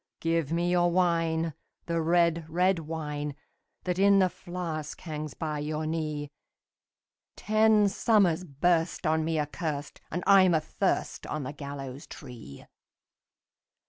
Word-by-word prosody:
"Give 165 -3 0
me 170 +1 +1
your 175 -1 +3
wine, 165 -2 +1 0.3
the 170 -1 0
red, 170 -1 +2
red 180 +2 +2
wine, 150 -2 -4 0.5
That 180 0 -2
in 200 0 +6
the 185 -1 +4
flask 170 -4 -5
hangs 155 -3 -6
by 155 -2 -3
your 155 +1 -3
knee! 155 -2 -3 1.0
Ten 215 0 +4
summers 195 -4 +2
burst 165 +3 0
on 160 0 +2
me 160 0 -1
accurst, 150 0 -3
And 175 +2 -3
I'm 185 -3 +6
athirst 155 -1 -1
on 155 -2 -3
the 130 - -5
gallows 140 -2 -7
tree." 115 - -11
165 Hz, 125 wpm, -28 LUFS, 150-175 Hz, 1.0 s, in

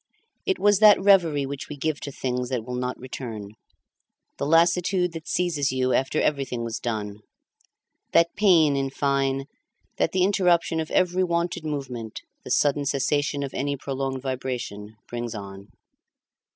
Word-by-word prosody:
It 385 - +2
was 205 -1 +4
that 215 -1 +8
reverie 175 -8 +4
which 140 0 -6
we 150 - -7
give 155 +1 -1
to 140 - -5
things 125 -2 -3
that 125 -4 -2
will 125 - -6
not 125 0 -3
return, 115 -5 -7 0.9
the 140 - -1
lassitude 175 +3 +3
that 165 -1 -8
seizes 160 -6 0
you 130 0 0
after 135 +3 +1
everything 135 -5 -1
was 115 -1 -4
done; 105 -3 -4 0.9
that 170 0 +4
pain, 170 -8 +4
in 135 0 -1
fine, 135 0 0 0.5
that - - +1
the 185 -1 +2
interruption 175 -4 +2
of 160 - -3
every 185 0 +2
wonted 170 -1 -1
movement, 130 -7 -5 0.2
the - - -9
sudden 145 -1 +2
cessation 145 +1 0
of 135 - -5
any 140 +1 -2
prolonged 135 -1 -4
vibration, 125 -5 -4
brings 120 -1 -5
on. 100 -1 -9
140 Hz, 150 wpm, -25 LUFS, 125-170 Hz, 0.9 s, that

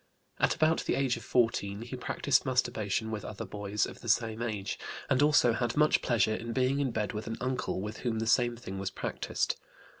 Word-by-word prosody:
At - - +3
about 155 +1 +2
the - - +1
age 135 -3 +1
of 115 - -8
14 115 -4 +1
he 120 +2 -6
practised 130 +1 +1
masturbation 110 -4 0
with 105 -1 -4
other 100 - -6
boys 105 0 -1
of - - -9
the 120 - -5
same 115 0 +1
age, 105 -5 -3 0.3
and 130 - +4
also 145 -5 +5
had 120 +3 -1
much 150 0 +4
pleasure 110 -3 +2
in 115 +1 -4
being 130 +2 +2
in 140 -2 +1
bed 110 -3 -2
with 105 +1 -5
an 115 - -3
uncle 130 -6 -2
with 105 +2 -5
whom 120 -3 -2
the 110 - -1
same 120 +1 +3
thing 95 -4 -6
was 95 0 -2
practised. - - -2
115 Hz, 210 wpm, -30 LUFS, 105-130 Hz, 0.3 s, also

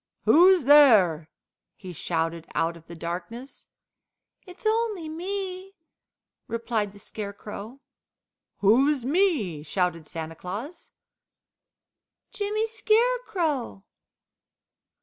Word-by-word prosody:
"Who's 360 +1 +6
there?" 215 - +6 0.5
he 185 -3 -10
shouted 165 0 -2
out 165 +2 0
of 165 -1 -16
the 170 - -9
darkness. 180 +11 -7 0.8
"It's 365 +5 -13
only 435 -6 0
me," 375 +3 -5 0.7
replied 230 -3 -2
the 205 - -16
Scarecrow. 210 +4 -8 0.8
"Who's 255 +6 +3
me?" 280 - +1
shouted 165 0 -2
Santa 160 0 -6
Claus. 210 - -7 1.4
"Jimmy 425 +2 -1
Scarecrow!" 435 - 0
245 Hz, 85 wpm, -26 LUFS, -, 1.4 s, Who's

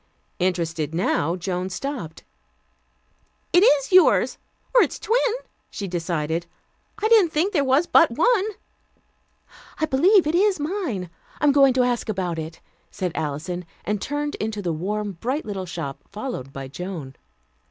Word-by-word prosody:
Interested 165 -4 -1
now, 170 -2 +1
Joan 185 0 -3
stopped. 190 - -5 1.3
"It 350 - +7
is 290 - +4
yours, 370 0 +5 0.3
or - - +7
its - - 0
twin," 465 +4 +1 0.5
she 200 - -5
decided. 170 -1 -2 0.5
"I 430 - +1
didn't 430 -7 +5
think 350 +7 +1
there 290 -6 +3
was 270 +5 +3
but - - +5
one." 485 -6 +2 1.3
"I 315 - +2
believe 340 +7 +4
it 305 - 0
is 385 0 +3
mine. 290 - -3 0.3
I'm 295 - +4
going 275 -1 +6
in - - +1
to 255 - +4
ask 245 -2 -1
about 180 -5 -2
it," 160 +1 -7 0.3
said 180 -2 -3
Alison, 160 +5 -3 0.2
and 210 -1 -1
turned 290 +1 -2
into 215 -1 -3
the 170 -2 -1
warm 205 +6 -2
bright 265 +6 -2
little 195 -3 -4
shop, 165 -6 -5
followed 205 - -5
by 135 -1 -7
Joan. 160 -2 -6
210 Hz, 150 wpm, -23 LUFS, -, 1.3 s, It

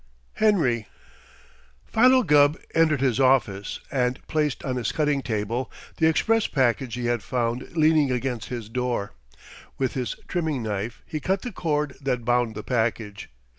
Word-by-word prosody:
HENRY 145 - +2 1.0
Philo 255 +3 +5
Gubb 145 -2 +4 0.2
entered 155 -4 +3
his 130 -2 +1
office 120 -7 +2
and 125 -1 0
placed 150 -3 -1
on 130 -2 -1
his 120 -4 -1
cutting 150 -3 +1
table 115 +2 -2 0.3
the 160 - +4
express 225 +8 +2
package 130 -2 0
he 125 -1 -4
had 120 -1 0
found 125 +6 -3
leaning 155 -2 +4
against 125 -2 -2
his 120 -4 -5
door. 120 -3 -2 0.6
With 130 -2 -1
his 125 -3 -3
trimming 160 -8 -1
knife 110 +1 -4
he 155 - -4
cut 190 +5 -1
the 245 - -4
cord 150 -6 -1
that 125 -4 -2
bound 120 -2 +1
the 105 - -6
package. 110 -4 -2
130 Hz, 150 wpm, -25 LUFS, 120-150 Hz, 1.0 s, Philo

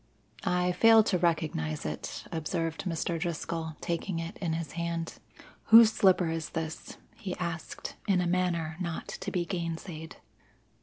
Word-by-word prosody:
"I 180 0 +2
fail 225 +3 +7
to 190 -4 +1
recognize 155 - 0
it," - - -5
observed 165 +1 -2
Mr. 170 -1 -1
Driscoll, 165 -1 -3
taking 170 +1 -2
it 165 0 -4
in 170 -4 -1
his 160 -2 -3
hand. 170 -1 -3 0.5
"Whose 225 0 +9
slipper 185 -3 +4
is 165 -1 -3
this?" 160 -1 -5 0.2
he 195 -5 -5
asked 170 -2 -5
in 195 -3 +4
a 180 - +1
manner 170 -3 0
not 170 -3 -3
to - - -5
be 175 -2 -1
gainsaid. 165 -2 -5
170 Hz, 145 wpm, -30 LUFS, 160-180 Hz, 0.5 s, Whose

